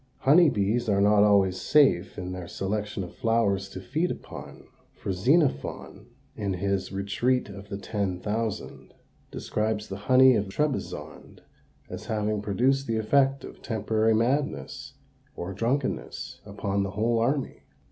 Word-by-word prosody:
Honey 160 +4 +6
bees 110 +1 0
are 100 -1 +3
not 105 +1 +5
always 95 -3 +3
safe 120 -6 +3
in 90 -1 -5
their 90 -2 -6
selection 105 +1 -3
of 90 - -9
flowers 100 -4 +1
to 95 - -8
feed 150 - -1
upon, - - -8 0.3
for - - -4
Xenophon, 135 - 0 0.3
in 100 -2 -2
his 95 0 -2
"Retreat 100 +6 0
of 100 0 -10
the 100 - -4
Ten 100 -3 -3
Thousand," 110 +2 -4 0.3
describes 110 0 -2
the 95 - -5
honey 130 0 +7
of 105 -2 0
Trebizond 150 +6 -4 0.4
as - - -8
having 105 -1 -1
produced 130 +7 +1
the 115 -1 0
effect 135 +5 +2
of - - -11
temporary 110 -1 +1
madness, 120 - -1 0.4
or 90 +2 -5
drunkenness, 125 +7 -2
upon 100 0 -2
the 100 - -1
whole 115 +2 +2
army. 135 +4 -1
105 Hz, 140 wpm, -27 LUFS, 100-125 Hz, 0.4 s, honey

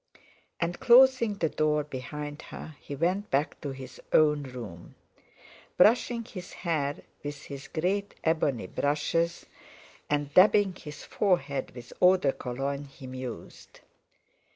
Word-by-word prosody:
And 175 +1 -2
closing 255 -3 +6
the 165 -5 0
door 150 -1 +1
behind 145 +2 -6
her 155 - -9
he 140 - -6
went 180 +7 0
back 140 +3 0
to 145 - -4
his 135 -1 -9
own 150 -1 +4
room. 120 -11 -9 0.8
Brushing 230 +3 +4
his 185 -4 -9
hair 150 -5 -2 0.2
with 145 0 -6
his 140 -1 -8
great 195 +5 -1
ebony 150 - +1
brushes, 150 - 0 0.6
and 145 -1 -1
dabbing 195 +1 +6
his 150 -4 -10
forehead 175 -9 0
with 120 -1 -10
eau 185 +1 +7
de 140 -7 +1
Cologne, 135 +3 -4
he 140 0 -13
mused. 130 -2 -8
150 Hz, 130 wpm, -28 LUFS, 140-180 Hz, 0.8 s, eau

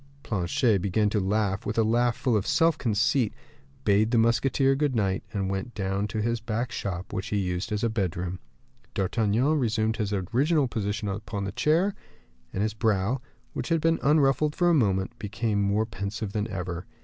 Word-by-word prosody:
Planchet 105 - +1
began 105 +2 +1
to 105 - +1
laugh 100 0 0
with 105 +2 -3
a 115 - +4
laugh 120 +2 +2
full 125 -4 +1
of 105 -1 0
self 165 0 +3
conceit; 115 0 +1 0.5
bade 105 +1 +4
the 120 - +2
musketeer 130 +4 +3
good 140 -1 0
night, 95 -4 0
and 100 -3 -2
went 95 +5 -4
down 100 0 -1
to 105 0 -2
his 115 +1 0
back 115 +2 -3
shop, 95 -4 -4
which 95 +3 -3
he 105 - -1
used 90 +2 -2
as 105 +1 -1
a - - +3
bedroom. 95 -4 -2 0.6
D'Artagnan 115 - +1
resumed 110 -2 0
his 105 -2 -2
original 130 - +1
position 105 -2 -2
upon 100 0 -4
his 95 - -4
chair, 170 - +2 0.6
and 100 - -1
his 110 -1 -1
brow, 110 +2 0 0.3
which - - -4
had 165 -1 +3
been 165 +1 +2
unruffled 150 0 +3
for 175 -1 +3
a - - +4
moment, 105 - +1
became 105 -1 -1
more 100 +2 +1
pensive 100 -1 -4
than 105 0 -1
ever. 90 -3 -5
110 Hz, 185 wpm, -27 LUFS, 100-120 Hz, 0.6 s, a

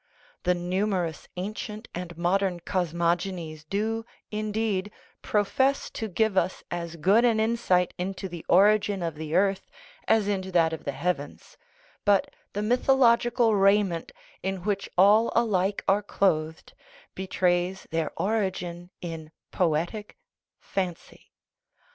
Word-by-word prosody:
The 180 0 +3
numerous 180 -2 -1
ancient 210 +3 -5
and 175 -1 -6
modern 180 +1 +1
cosmogonies 170 -2 -1
do, 220 +3 -1 0.3
indeed, 210 -2 -1 0.3
profess 265 +7 +1
to 220 - -4
give 215 +2 +1
us 185 0 0
as 170 -1 -4
good 195 +8 +4
an 230 -3 +3
insight 220 -5 +2
into 190 +2 -3
the 175 -3 -8
origin 200 0 +4
of 165 -1 -2
the 155 +1 -5
earth 195 +1 +1 0.4
as 220 -2 +3
into 190 -2 -2
that 165 -2 +3
of 160 - -7
the 140 - -1
heavens; 145 -2 -4 0.5
but 205 -2 +2 0.2
the 205 - -2
mythological 240 -1 +3
raiment, 195 -4 +2 0.3
in 190 -2 -3
which 200 -1 -1
all 210 +5 +6
alike 200 -4 +1
are 195 +2 +4
clothed, 160 -6 -1 0.4
betrays 185 0 0
their 165 -1 -1
origin 185 -4 -2
in 165 -3 -6 0.2
poetic 175 +5 -1 0.4
fancy. 185 -3 -5
190 Hz, 120 wpm, -27 LUFS, 175-210 Hz, 0.5 s, all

